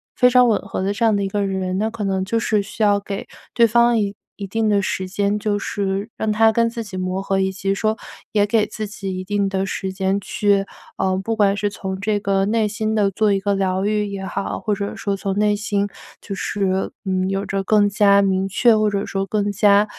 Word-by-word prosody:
非 250 - +5
常 250 0 +5
吻 210 - +2
合 195 -1 -5
的 195 - 0
这 230 +3 0
样 220 - +4
的 200 - 0
一 - - 0
个 200 +1 -1
人。 190 -1 -2
那 220 +3 0
可 220 -1 -5
能 190 -1 0
就 230 +4 0
是 215 -2 +1
需 215 +2 -9
要 205 -1 +4
给 200 0 -6 0.3
对 235 -1 +5
方 235 +1 +4
一 200 -1 -1 0.2
一 200 - -6
定 220 +3 0
的 205 -1 +3
时 190 0 -2
间， 200 +2 0
就 205 -1 -1
是 200 +1 -2
让 220 -1 0
他 225 +1 +5
跟 230 +1 +2
自 230 0 -5
己 200 -3 -9
磨 185 +1 -2
合， 195 0 0
以 190 0 0
及 195 +1 -2
说 215 +2 0 0.3
也 205 -1 +3
给 210 0 +2
自 215 0 -5
己 195 -2 -5
一 185 - -4
定 200 0 0
的 195 0 -1
时 190 0 -3
间 190 +1 0
去， 200 0 +1 0.3
嗯， 190 0 0
不 225 +3 -2
管 200 -2 +3
是 205 0 0
从 190 -1 -5
这 205 0 0
个 195 -1 +1
内 220 +1 +1
心 215 +1 -2
的 200 -2 +2
做 210 +1 +2
一 195 - +1
个 200 +1 +1
疗 190 -1 0
愈 210 0 0
也 200 -1 -5
好， 195 +1 -3
或 210 - -1
者 200 0 -3
说 200 - -2
从 195 0 -3
内 210 0 +3
心 205 -1 -1 0.3
就 200 - -6
是， 195 -1 -1 0.2
嗯， 185 0 0
有 195 +1 -2
着 195 -1 -2
更 205 -1 +4
加 200 -1 +4
明 190 -1 +1
确， 220 +3 +4
或 215 0 +2
者 200 -1 -2
说 195 0 -2
更 205 0 -1
加 205 +1 +4
200 Hz, 260 characters per minute, -21 LUFS, 195-215 Hz, 0.3 s, 非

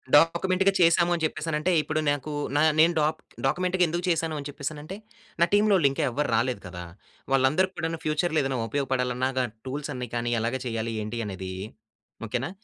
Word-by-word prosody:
డాక్యుమెంట్‌గా 185 +5 +4
చేసాము 170 0 +4
అని 165 -2 -2
చెప్పేసనంటే 155 +2 -1
ఇప్పుడు 155 +1 -2
నాకు 145 +1 -2 0.3
నా - - +4 0.2
నేను 170 +2 +6
డాక్ 155 +1 +1 0.3
డాక్యుమెంట్‌గా 180 +5 +1
ఎందుకు 175 +2 -2
చేశాను? 160 -1 0
అని 140 - -6
చెప్పేసననంటే 150 +5 -6 0.4
నా 170 - +8
టీమ్‌లోళ్ళు 205 -7 +5
ఇంకా 135 - -2
ఎవ్వరు 145 +4 -1
రాలేదు 120 -3 0
కదా! 90 0 -7 0.5
వాళ్ళందరికి 150 +9 +3
కూడాను 165 0 -2
ఫ్యూచర్‌లో 155 +1 +1
ఏదైనా 135 -2 -1
ఉపయోగపడాలన్న 130 -2 0
గ 130 - +2 0.2
టూల్స్ 145 +3 -4
అన్ని 125 -2 -5
కానీ 120 0 -1
ఎలాగ 115 +3 -1
చేయాలి? 115 -1 -2
ఏంటి? 115 +2 -4
అనేది 95 -1 -6 0.7
ఓకెనా! 125 +7 -2
150 Hz, 160 wpm, -26 LUFS, 125-170 Hz, 0.7 s, నా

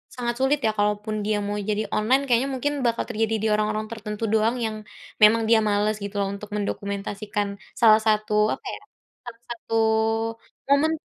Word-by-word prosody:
sangat 240 -2 -2
sulit 270 +2 +2
ya. - - +2
Kalaupun 210 +1 -1
dia 215 0 +1
mau 205 - -2
jadi 210 +1 0
online, 250 +6 +3
kayaknya 250 +2 +2
mungkin 270 +2 -1
bakal 235 -1 0
terjadi 225 -1 -1
di - - +2
orang-orang 215 0 0
tertentu 215 -1 -6
doang 220 +2 +2
yang, 220 -1 -3 0.5
memang 220 +1 +6
dia 225 0 +5
males 210 +1 +1
gitu 200 0 -4
loh, 200 - +1
untuk 210 +1 -10
mendokumentasikan 205 0 -3 0.3
salah 220 -1 +7
satu 215 0 +1 0.2
apa - - -5
ya? - - -10 0.5
Salah 235 -1 -10
satu 230 -1 -5 0.9
momen 285 +3 +4
lah - - -67
215 Hz, 175 wpm, -24 LUFS, 210-235 Hz, 0.9 s, salah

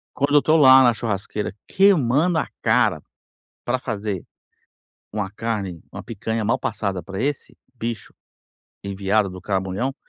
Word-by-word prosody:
Quando 145 +1 0
eu - - +8
estou 155 +2 +3
lá 130 -3 +8
na 120 -2 +5
churrasqueira 105 -2 -3
queimando 165 -3 +3
a - - -1
cara - - +2 0.6
para 130 +1 0
fazer 105 -6 -4 0.9
uma 105 -3 -3
carne, 100 -6 -4
uma 100 - -8
picanha 110 +1 -3
mal 120 +4 +1
passada 100 -6 -3
para 100 +4 -5
esse 145 0 -3 0.2
bicho 115 -3 -5 0.7
enviado 100 +1 0
do 90 0 -9
caramunhão, 95 +7 -2
110 Hz, 135 wpm, -22 LUFS, 100-130 Hz, 0.9 s, eu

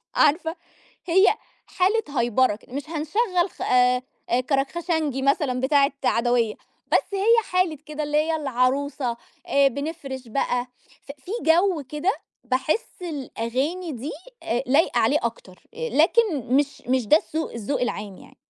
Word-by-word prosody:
عارفة 320 +3 +2 0.5
هي 380 +3 +5 0.4
حالة 370 - 0
هيبرة 240 -1 +2
ك - - -23
مش 285 +5 -6
هنشغَّل 360 +4 0
خ - - -10
آآ، 250 0 +3 0.5
كَركْخَشنجي 295 0 0
مثلًا 275 -2 +1
بتاعة 275 +1 +3
عدويّة، 235 -2 +2 0.4
بس - - +2
هي 425 +4 +4
حالة 365 -5 +1
كده، 305 0 -4
اللي 295 0 -1
هي 320 +2 +2
العروسة، 270 -2 0 0.3
آآ 280 0 +4
بنفرِش 275 -2 -6
بقى. 245 +1 -1 0.4
ف 280 - -9
في 270 - -12
جو 340 0 +3
كده، 300 +6 0 0.3
باحس 290 - -1
الأغاني 295 +2 -3
دي 255 +5 -5 0.3
أ 240 +2 -1
لايقة 285 +7 +3
عليه - - +3
أكتر، - - -5
لكن 360 - +2
مش 285 0 0
مش 255 -2 +1
ده 300 - +6
السّوق 320 0 -3
الذّوق 235 +5 -2
العام 205 -5 -3
يعني. - - -16
285 Hz, 135 wpm, -24 LUFS, 255-335 Hz, 0.5 s, ده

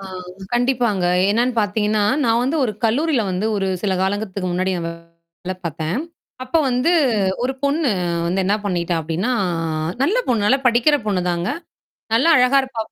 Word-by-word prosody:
ஆ. 195 - -9 0.5
கண்டிப்பாங்க. 240 -7 +1 0.2
என்னான்னு 240 +3 +1
பார்த்தீங்கன்னா, 210 0 0 0.2
நான் 230 0 +2
வந்து 275 +6 0
ஒரு 215 - -1
கல்லூரியில 265 +3 +2
வந்து 185 +4 -1
ஒரு 195 - -1 0.2
சில 195 -2 0
காலங்களுக்கு 195 -1 -2
முன்னாடி 185 +2 0
நான் 170 - -3
வேலை 170 +2 -10
பார்த்தேன். 160 +4 -3 0.5
அப்ப 260 +6 0
வந்து 250 +7 +1 0.5
ஒரு 265 +1 0
பொண்ணு 285 +1 +1 0.4
வந்து 185 +3 0
என்னா 200 - +2
பண்ணிட்டா 175 -2 -1
அப்படீன்னா 165 +9 -2 0.7
நல்ல 385 - +2
பொண்ணு, 220 -4 +1
நல்லா 265 +5 +3
படிக்கிற 245 +5 +4
பொண்ணுதாங்க. 180 -3 -1 0.7
நல்லா 260 +8 +3
அழகா 250 +2 +4
இருப்பா 250 -4 -4
210 Hz, 150 wpm, -20 LUFS, 180-250 Hz, 0.7 s, படிக்கிற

